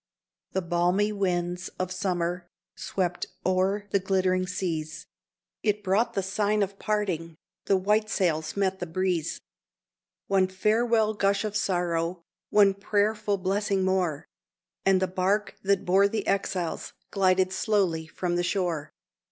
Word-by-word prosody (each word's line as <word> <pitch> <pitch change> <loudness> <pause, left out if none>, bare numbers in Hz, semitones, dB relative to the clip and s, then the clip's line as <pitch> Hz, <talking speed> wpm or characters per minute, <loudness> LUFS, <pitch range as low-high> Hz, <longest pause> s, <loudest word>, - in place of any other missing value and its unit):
The 190 - 0
balmy 175 +4 +2
winds 180 -3 -1
of 185 0 -2
summer 180 -2 -2 0.3
swept 180 -2 -2 0.2
o'er 190 +2 +1
the 200 - +3
glittering 185 -1 +1
seas; 160 -4 -3 0.6
It 210 -1 0
brought 200 +5 +1
the 195 - 0
sign 205 +2 +1
of 195 0 -5
parting 180 -6 -1 0.3
the 195 - +3
white 210 +3 +1
sails 160 -3 0
met 190 -1 +1
the 180 - -4
breeze; 175 -1 -1 0.9
One 190 -1 +3
farewell 220 +3 +2
gush 200 0 +1
of 210 -1 -4
sorrow, 175 -4 0 0.3
one 200 -2 +5
prayerful 205 +1 0
blessing 195 +1 0
more, 180 -6 0 0.6
And 190 -1 +5
the - - +2
bark 190 +3 0
that 195 -1 +1
bore 195 +3 +5
the 210 0 -3
exiles 190 -3 -1 0.2
glided 185 -1 +2
slowly 185 -6 +1
from 175 +2 -2
the 175 - +1
shore. 170 -5 -1
190 Hz, 135 wpm, -27 LUFS, 180-200 Hz, 0.9 s, one